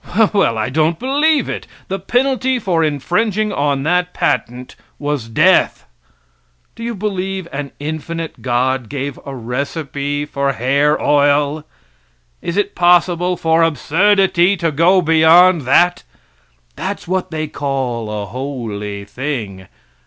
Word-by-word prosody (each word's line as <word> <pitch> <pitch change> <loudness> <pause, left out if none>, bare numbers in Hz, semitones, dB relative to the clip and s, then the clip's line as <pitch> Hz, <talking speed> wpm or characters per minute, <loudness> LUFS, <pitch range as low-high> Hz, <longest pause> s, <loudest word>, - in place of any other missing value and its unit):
Well, 195 - +2
I 110 +2 -1
don't 155 +4 +1
believe 285 +2 +1
it. - - -5 0.2
The 195 +1 -3
penalty 260 +5 0
for 180 -8 0
infringing 205 - 0
on 140 -1 0
that 180 +3 0
patent 125 +2 -2 0.2
was 145 -6 -3
death. 160 +10 +3 0.9
Do - - -13
you 235 0 -3
believe 190 -2 -3
an 140 0 -5
infinite 160 +2 -5
God 125 -1 0
gave 140 -1 -4
a 135 - -6
recipe 140 +3 -3
for 140 -1 -1
hair 140 +5 +1
oil? 145 +1 +2 0.7
Is 170 +2 -4
it 205 0 0
possible 175 0 +2
for 160 0 +2
absurdity 185 +4 +2
to 165 -1 0
go 175 +5 +3
beyond 165 0 +5
that? 175 +5 +4 0.7
That's - - -5
what 185 +1 -1
they 155 -1 -3
call 135 -6 -3
a 105 -1 -4
holy 105 -6 -5
thing. 105 -7 -5
155 Hz, 125 wpm, -17 LUFS, 135-180 Hz, 0.9 s, beyond